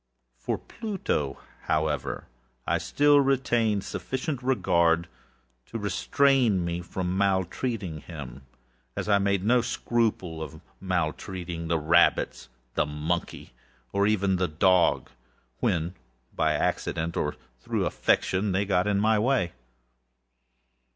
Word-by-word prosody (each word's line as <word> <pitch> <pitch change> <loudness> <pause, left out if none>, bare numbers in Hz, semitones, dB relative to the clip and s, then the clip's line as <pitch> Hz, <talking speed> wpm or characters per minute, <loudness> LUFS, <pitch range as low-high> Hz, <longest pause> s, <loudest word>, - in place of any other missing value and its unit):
For - - -3
Pluto, 190 - -3 0.3
however, 80 0 -1 0.4
I - - +1
still 145 0 +4
retained 120 -6 +1
sufficient 130 +1 -3
regard 85 -9 +2 0.6
to 115 - -5
restrain 115 -1 +2
me 85 0 -2
from 90 +1 -3
maltreating 95 -1 -1
him, 70 -5 -9 0.5
as - - -3
I 100 -1 +4
made 100 -1 +1
no 120 +2 +4
scruple 110 -9 -1
of 80 0 -7 0.2
maltreating 90 -1 -3
the 85 0 +1
rabbits, 80 -4 +2 0.2
the - - +1
monkey, 75 +4 -3 0.4
or 100 +1 +3
even 100 -3 +2
the 90 0 +1
dog, 90 +3 +3 0.5
when 85 +1 0 0.4
by - - +2
accident, 85 0 -1
or - - -1 0.2
through - - -1
affection, 95 +1 +1
they 100 +2 +1
came 95 -1 +1
in 100 -1 +2
my 110 +1 +3
way. 120 -6 +1
95 Hz, 115 wpm, -27 LUFS, 85-110 Hz, 0.6 s, still